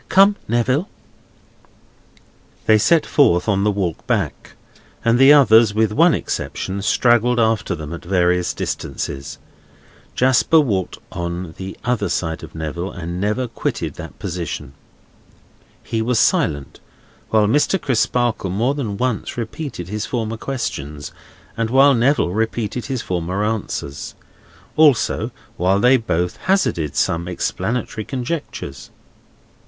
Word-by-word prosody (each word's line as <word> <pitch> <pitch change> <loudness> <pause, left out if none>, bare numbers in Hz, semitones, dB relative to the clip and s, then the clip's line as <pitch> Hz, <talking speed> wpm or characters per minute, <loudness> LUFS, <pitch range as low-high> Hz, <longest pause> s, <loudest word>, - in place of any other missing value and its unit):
"Come, 195 +2 +6
Neville!" 130 - +1 1.8
They 110 -1 +5
set 165 +8 +3
forth 90 - +3
on 100 -2 +2
the 105 - +3
walk 95 -5 -2
back; - - -2 0.5
and 115 +1 +3
the 135 +2 +8
others, 115 -7 +6
with 110 -1 +2
one 165 +6 +5
exception, 95 +1 -4
straggled 120 +3 +3
after 110 -5 +1
them 75 0 -7
at 85 - -7
various 90 -1 +1
distances. 70 +2 -4 0.8
Jasper 130 +5 +4
walked 100 - -1
on 85 0 -4
the 95 +1 -6
other 120 -6 0
side 80 -2 -2
of - - -11
Neville, 80 +4 -4
and 90 0 -5
never 105 +5 0
quitted - - -3
that - - -10
position. 80 -5 -5 1.1
He 115 -1 -2
was 120 +1 0
silent, 70 -9 +1 0.5
while 110 -1 +3
Mr. 150 - +2
Crisparkle 120 - 0
more 115 +9 +1
than 115 -9 -3
once 125 -1 -2
repeated 115 - -5
his 105 +2 -3
former 115 -2 -2
questions, 75 - -5 0.4
and 115 0 -1
while 135 +3 +6
Neville 125 -5 +2
repeated 110 +2 -2
his 130 -3 -3
former 90 +3 -2
answers; 105 -10 -4 0.6
also, 150 -6 +3 0.3
while 95 +3 +2
they 125 +4 +5
both 90 -8 -1
hazarded 85 - 0
some 85 +1 0
explanatory 110 +5 -2
conjectures. 125 - -5
110 Hz, 125 wpm, -20 LUFS, 90-125 Hz, 1.8 s, the